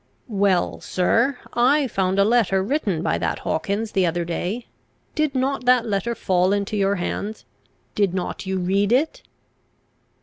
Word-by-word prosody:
"Well, 195 Hz, -5 st, +1 dB
sir: 230 Hz, +8 st, +1 dB, 0.2 s
I 270 Hz, +5 st, +3 dB
found 190 Hz, -5 st, 0 dB
a 200 Hz, -, +5 dB
letter 205 Hz, -4 st, +2 dB
written 205 Hz, -, -1 dB
by 85 Hz, -, 0 dB
that 85 Hz, -1 st, -1 dB
Hawkins 200 Hz, +7 st, -2 dB
the 190 Hz, -, +2 dB
other 175 Hz, 0 st, 0 dB
day; 185 Hz, +7 st, -3 dB, 0.5 s
did 305 Hz, -3 st, 0 dB
not 260 Hz, 0 st, -1 dB
that 250 Hz, -1 st, +4 dB
letter 215 Hz, +2 st, -1 dB
fall 185 Hz, -1 st, +2 dB
into 205 Hz, +1 st, -1 dB
your 200 Hz, 0 st, +2 dB
hands? 200 Hz, +4 st, -4 dB, 0.5 s
Did 200 Hz, -3 st, +1 dB
not 185 Hz, +1 st, -4 dB
you 190 Hz, 0 st, -1 dB
read 195 Hz, +3 st, +1 dB
it?" 280 Hz, +6 st, +1 dB
200 Hz, 155 wpm, -22 LUFS, 185-240 Hz, 0.5 s, a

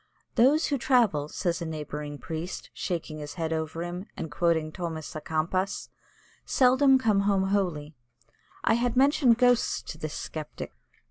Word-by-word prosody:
"They 235 Hz, -, +5 dB
who 290 Hz, 0 st, +3 dB
travel," 220 Hz, -, +2 dB
says 170 Hz, 0 st, -2 dB
a -, -, -2 dB
neighbouring 150 Hz, -1 st, -5 dB
priest, 165 Hz, +4 st, -6 dB
shaking 165 Hz, -4 st, -4 dB
his 145 Hz, -1 st, -7 dB
head 165 Hz, -2 st, -2 dB
over 160 Hz, +1 st, -3 dB
him, 175 Hz, +3 st, -5 dB
and 160 Hz, -, -5 dB
quoting 160 Hz, -1 st, +1 dB
Thomas 160 Hz, -3 st, -5 dB
Á'Kempis, 160 Hz, +5 st, -2 dB, 0.5 s
"seldom 265 Hz, +1 st, +5 dB
come 220 Hz, -6 st, +2 dB
home 200 Hz, -1 st, +2 dB
holy." 170 Hz, -7 st, -1 dB, 0.7 s
I -, -, +4 dB
had 240 Hz, +2 st, 0 dB
mentioned 270 Hz, -3 st, +5 dB
ghosts 245 Hz, -1 st, +3 dB
to 160 Hz, -, -8 dB
this 155 Hz, -2 st, -4 dB
Sceptic. 155 Hz, -2 st, -6 dB
175 Hz, 145 wpm, -27 LUFS, 155-235 Hz, 0.7 s, They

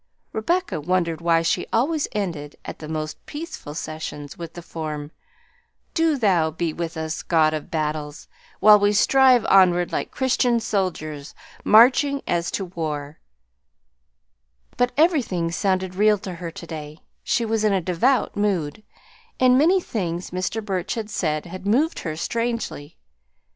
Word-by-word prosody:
Rebecca 340 Hz, -, -1 dB
wondered 170 Hz, 0 st, 0 dB
why 165 Hz, -1 st, +3 dB
she 165 Hz, -, 0 dB
always 285 Hz, +6 st, +1 dB
ended, 165 Hz, -8 st, -4 dB
at -, -, -7 dB
the 155 Hz, -, -8 dB
most 155 Hz, 0 st, -5 dB
peaceful 295 Hz, -, -7 dB
seasons, 155 Hz, -2 st, -6 dB
with 170 Hz, -1 st, -8 dB
the 175 Hz, -, -8 dB
form, 155 Hz, -3 st, -6 dB, 0.8 s
"Do 325 Hz, -3 st, +2 dB
Thou 185 Hz, -9 st, +2 dB
be 160 Hz, 0 st, -3 dB
with 165 Hz, -1 st, -5 dB
us, 160 Hz, 0 st, -3 dB
God 155 Hz, -2 st, +2 dB
of 155 Hz, -1 st, -5 dB
Battles, 150 Hz, -1 st, -3 dB, 0.3 s
while 210 Hz, -1 st, +8 dB
we 205 Hz, +1 st, +3 dB
strive 255 Hz, +2 st, +5 dB
onward 180 Hz, -2 st, +4 dB
like -, -, -2 dB
Christian 250 Hz, -2 st, +1 dB
soldiers 160 Hz, -9 st, -3 dB, 0.3 s
marching 265 Hz, +5 st, +5 dB
as 170 Hz, -1 st, 0 dB
to 195 Hz, -, -3 dB
war;" 155 Hz, -4 st, -5 dB, 1.6 s
but 245 Hz, 0 st, +1 dB
everything 250 Hz, -, +2 dB
sounded 185 Hz, 0 st, 0 dB
real 210 Hz, +2 st, +4 dB
to 190 Hz, -2 st, -7 dB
her 170 Hz, 0 st, -6 dB
to 165 Hz, -, -10 dB
day, 155 Hz, -2 st, -8 dB, 0.2 s
she 235 Hz, -, 0 dB
was 220 Hz, -1 st, 0 dB
in 215 Hz, -, +3 dB
a 195 Hz, -, +2 dB
devout 185 Hz, +10 st, +1 dB
mood, 200 Hz, -4 st, -1 dB, 0.6 s
and 255 Hz, -1 st, +5 dB
many 335 Hz, +8 st, +4 dB
things 180 Hz, -, -4 dB
Mr. 185 Hz, +4 st, -3 dB
Burch 185 Hz, -1 st, -2 dB
had 220 Hz, -2 st, -5 dB
said 155 Hz, -3 st, -1 dB
had 185 Hz, +2 st, -8 dB
moved 280 Hz, +10 st, +2 dB
her 155 Hz, -3 st, -4 dB
strangely. 230 Hz, -6 st, -3 dB
185 Hz, 150 wpm, -23 LUFS, 160-225 Hz, 1.6 s, while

